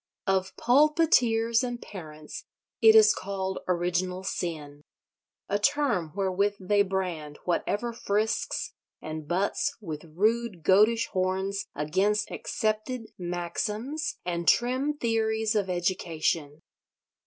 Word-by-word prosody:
Of 190 -1 0
pulpiteers 250 -5 +3
and 245 -1 -3
parents 155 -8 -9 0.4
it 445 0 +8
is 435 0 +8
called 190 -1 -4
Original 180 +1 -1
Sin: 150 -6 -4 0.7
a 205 - 0
term 210 - +1
wherewith 200 +1 +1
they 200 +2 +2
brand 180 -6 -2
whatever 205 +6 -1
frisks 220 +1 -1 0.3
and 155 -1 -7
butts 185 +5 0
with 160 -8 -6
rude 215 -2 0
goatish 215 +6 +4
horns 190 +1 -1
against 195 +8 0
accepted 220 +2 -2
maxims 210 - -3
and 170 -1 -2
trim 260 +5 +2
theories 220 -2 0
of 205 -3 0
education. 165 -4 -1
200 Hz, 105 wpm, -27 LUFS, 175-230 Hz, 0.7 s, it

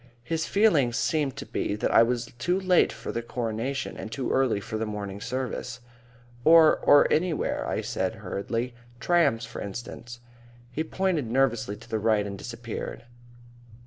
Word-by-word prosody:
His 160 +6 -2
feeling 165 - +3
seemed 145 +1 0
to - - -6
be 100 - -2
that 105 - -1
I - - +8
was 120 0 0
too 180 +7 +1
late 185 -2 +3
for - - -6
the 115 - -2
Coronation 120 +3 -3
and 110 - -7
too 130 +1 -2
early 130 -6 +2
for 110 +2 -5
the 110 - -2
morning 100 -1 -5
service. 125 0 -4 0.6
"Or 160 +1 +7
or 145 - +6
anywhere," 160 0 0
I - - -1
said - - -2
hurriedly. 115 +5 -3 0.3
"Trams, 145 -9 +2
for - - -8
instance." 120 +3 -7 0.5
He 155 +5 -2
pointed 165 -6 -1
nervously 115 -4 +1
to - - -15
the 110 - -2
right 105 -1 +2
and 100 -1 -5
disappeared. 115 +3 -6
120 Hz, 160 wpm, -27 LUFS, 110-150 Hz, 0.6 s, I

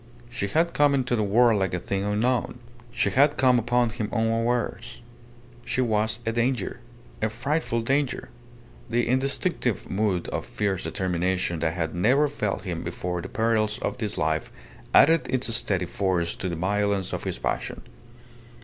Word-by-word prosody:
She 120 -4 -2
had 165 - +1
come 145 -1 +4
into 130 -2 0
the 110 - 0
world 110 +1 +4
like 95 -2 0
a - - -2
thing 95 +2 -2
unknown. 115 +6 0 0.3
She 120 +1 +1
had 145 +3 +4
come 125 -2 +5
upon 120 0 +1
him 110 -2 -3
unawares. 115 +1 -1 0.6
She - - -2
was 110 -3 +1
a 115 - +1
danger. 120 -1 -1 0.4
A 110 - +1
frightful 120 +1 -1
danger. 135 +3 -1 0.6
The 120 +1 +1
instinctive 130 - 0
mood 95 -3 0
of - - -3
fierce 100 -3 -2
determination 90 -2 -1
that 80 0 0
had 80 -3 -2
never 130 +12 +3
failed 105 -8 -3
him 85 -4 -4
before 90 +1 -3
the 95 - -7
perils 110 -1 +1
of - - -3
this 105 -3 -2
life 80 0 -1 0.4
added 165 +3 +5
its 125 -3 0
steady 95 -4 0
force 90 -2 -1
to 95 - -3
the 85 - -3
violence 100 +2 0
of - - -3
his - - -2
passion. - - -3
110 Hz, 160 wpm, -25 LUFS, 95-125 Hz, 0.6 s, come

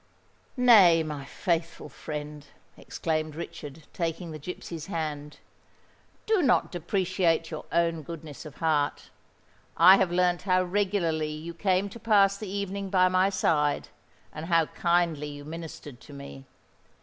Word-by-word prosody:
"Nay, 200 -10 +6
my 150 -3 -6
faithful 165 +1 -2
friend," 150 -1 -7 0.3
exclaimed 155 -1 -3
Richard, 150 -2 -8
taking 165 0 -3
the 155 - -7
gipsy's 165 0 -7
hand, 150 -4 -4 0.9
"do 435 -4 +2
not 265 -6 +2
depreciate 175 -2 0
your 155 - -6
own 165 -1 +1
goodness 155 -1 -9
of 155 -3 -11
heart. 150 -3 -1 0.7
I 185 +4 +8
have 190 -3 +1
learnt 175 0 +2
how 185 -1 +2
regularly 180 -5 0
you 160 +3 -7
came 185 +2 +1
to 235 - -11
pass 200 -3 +4
the 200 -1 -7
evening 200 0 -4
by 185 -1 +4
my 185 +1 +3
side, 150 -6 0 0.4
and 155 +2 -7
how 165 -2 +3
kindly 170 -3 0
you 145 -1 -9
ministered 155 -5 -9
to 145 - -13
me. 140 -1 -10
165 Hz, 135 wpm, -27 LUFS, 155-185 Hz, 0.9 s, I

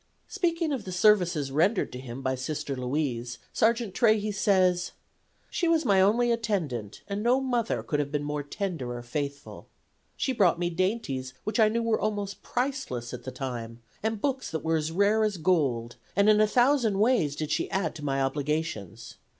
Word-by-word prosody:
Speaking 335 -5 0
of 265 -6 -2
the 185 - -5
services 180 -7 +3
rendered 180 +9 +1
him 125 0 -7
by 130 - +1
Sister 135 +2 -3
Louise 125 -2 -2 0.2
Sergeant 230 -2 +2
Trahey 215 -1 +3
says: 185 -3 +2 0.6
"She 345 - 0
was 330 -2 +2
my 195 -4 +4
only 235 +5 +3
attendant, 170 - -2
and 200 0 -3
no 245 +4 +3
mother 245 -4 -1
could 150 - -1
have 145 -1 -2
been 145 -1 -1
more 150 0 -2
tender 145 -4 -4
or 120 - -8
faithful. 140 +3 -5 0.5
She 265 - 0
brought 185 -8 +3
me 175 0 -1
dainties 165 - -2
which 215 +3 -2
I 215 -1 +6
knew 230 +2 0
were 230 -1 +1
almost 205 -2 -2
priceless 245 - -3
at 125 -1 -7
the 130 - -4
time, 120 -3 -6 0.2
and 220 0 -1
books 265 +2 -1
that 160 - -4
were 160 0 +2
as 155 +1 -2
rare 205 +5 +3
as 210 -3 0
gold, 140 -9 0 0.2
and 200 +2 +4
in 215 0 +6
a 215 - +5
thousand 245 -3 +3
ways 205 - +2
did 155 0 -4
she 155 - 0
add 190 -4 -1
to 150 - -9
my 135 -1 0
obligations. 135 - -3
180 Hz, 180 wpm, -27 LUFS, 140-220 Hz, 0.6 s, I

